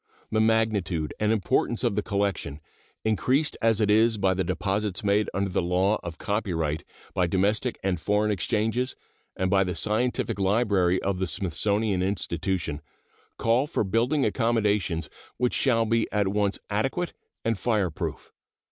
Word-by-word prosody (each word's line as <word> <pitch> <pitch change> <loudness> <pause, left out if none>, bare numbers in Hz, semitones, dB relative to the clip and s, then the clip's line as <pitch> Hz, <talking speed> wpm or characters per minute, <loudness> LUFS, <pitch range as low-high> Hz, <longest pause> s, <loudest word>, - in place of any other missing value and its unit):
The 110 - +2
magnitude 110 -8 +1
and 105 0 +2
importance 110 +3 +1
of 120 -5 +1
the 105 - +1
collection, 100 -8 -2 0.5
increased 130 +7 +1
as 115 -2 +3
it 105 -1 +3
is 110 +1 +4
by 95 -2 +2
the 95 0 0
deposits 95 +3 -2
made 105 +1 +2
under 100 +1 -1
the - - +1
law 90 +4 +1
of 85 -2 -7
copyright, 85 -8 -1 0.3
by 90 -1 +2
domestic 105 +7 0
and 95 -3 0
foreign 105 +4 +1
exchanges, 110 +6 0 0.4
and 95 0 -1
by 95 -1 +4
the 90 -2 -3
scientific 110 +2 0
library 95 -3 +2
of 95 -2 -1
the 95 - 0
Smithsonian 100 +2 0
Institution, 85 -4 -2 0.6
call 120 +5 +2
for 150 - 0
building 120 +8 +1
accommodations 105 - +1 0.3
which 125 0 +1
shall 115 -4 +2
be 115 0 +1
at 105 -2 +1
once 100 0 0
adequate 135 +12 -1 0.3
and 115 -3 0
fireproof. 105 -9 -2
105 Hz, 145 wpm, -26 LUFS, 95-110 Hz, 0.6 s, is